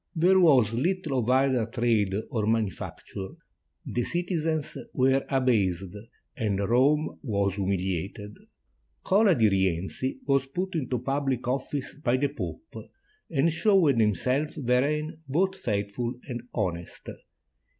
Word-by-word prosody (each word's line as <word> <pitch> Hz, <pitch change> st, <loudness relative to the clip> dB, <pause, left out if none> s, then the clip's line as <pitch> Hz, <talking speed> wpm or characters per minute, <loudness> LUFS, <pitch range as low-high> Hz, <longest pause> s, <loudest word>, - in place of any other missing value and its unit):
There 180 Hz, +4 st, +4 dB
was 130 Hz, -, +5 dB
little 155 Hz, +1 st, 0 dB
of 120 Hz, 0 st, -1 dB
either 130 Hz, -3 st, +3 dB
trade 115 Hz, -5 st, +1 dB, 0.2 s
or 110 Hz, -3 st, -1 dB
manufac 110 Hz, -3 st, -1 dB
ture. 95 Hz, -1 st, -7 dB, 0.5 s
The 120 Hz, -, -2 dB
citizens 165 Hz, 0 st, -2 dB, 0.2 s
were 135 Hz, +1 st, +3 dB
abased, 100 Hz, -9 st, +1 dB, 0.4 s
and 105 Hz, -7 st, -1 dB
Rome 130 Hz, +9 st, +2 dB
was 100 Hz, -7 st, 0 dB
humiliated. 95 Hz, +1 st, -3 dB, 0.7 s
Cola 195 Hz, -1 st, +4 dB
di 115 Hz, -3 st, +4 dB
Rienzi 95 Hz, +5 st, -1 dB
was 135 Hz, -1 st, +2 dB
put 185 Hz, +7 st, -3 dB
into 130 Hz, -6 st, -1 dB
public 135 Hz, 0 st, -1 dB
office 135 Hz, +2 st, -2 dB
by 125 Hz, +2 st, +2 dB
the 140 Hz, +2 st, +1 dB
Pope, 270 Hz, -, -7 dB, 0.6 s
and 155 Hz, +1 st, +2 dB
showed 170 Hz, -, +3 dB
himself 125 Hz, -, +1 dB
therein 150 Hz, +5 st, 0 dB
both 190 Hz, +7 st, +1 dB
faithful 105 Hz, -, -2 dB
and 120 Hz, -3 st, -4 dB
honest. 90 Hz, -6 st, -4 dB
130 Hz, 120 wpm, -27 LUFS, 105-150 Hz, 0.7 s, was